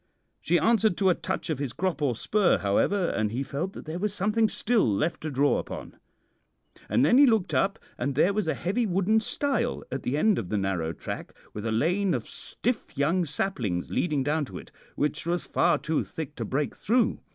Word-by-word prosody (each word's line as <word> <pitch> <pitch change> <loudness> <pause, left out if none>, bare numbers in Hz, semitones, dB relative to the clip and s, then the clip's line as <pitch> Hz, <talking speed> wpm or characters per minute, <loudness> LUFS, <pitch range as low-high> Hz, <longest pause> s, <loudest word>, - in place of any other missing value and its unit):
She 175 +3 +2
answered 220 -2 +3
to 190 -2 +4
a - - +4
touch 185 -1 -3
of 145 - -2
his 140 -5 -3
crop 180 -3 -2
or 135 -5 +1
spur, 200 - +2
however, 170 - +1
and 110 -1 -1
he 125 +4 -2
felt 150 +8 -4
that - - -9
there 160 +3 -4
was 205 +1 -1
something 215 +3 +2
still 225 - +2
left 155 +11 -1
to 155 - -3
draw 140 +1 +2
upon. - - -7 0.9
And - - +3
then 250 - +5
he 285 - +8
looked 220 -6 +2
up, 195 0 +2 0.2
and 140 -1 -1
there 175 +8 +3
was 210 -4 -1
a 160 - +1
heavy 215 +7 -1
wooden 195 +4 +2
stile 245 +1 -1
at 135 - -3
the 135 +4 -1
end 210 +4 +3
of 90 - -5
the 105 - 0
narrow 95 -5 -1
track, - - -7 0.2
with 105 +2 -4
a - - -1
lane 175 - +1
of - - -4
stiff 240 - -4
young 165 +6 +2
saplings 125 - -2
leading 150 -6 0
down 150 +2 0
to - - -9
it, - - -11 0.2
which 150 +2 -1
was 175 +1 -1
far - - +2
too 160 -1 -1
thick 155 -2 -7
to 115 - -3
break 140 +6 -1
through. 235 +3 +1
170 Hz, 210 wpm, -27 LUFS, 135-200 Hz, 0.9 s, he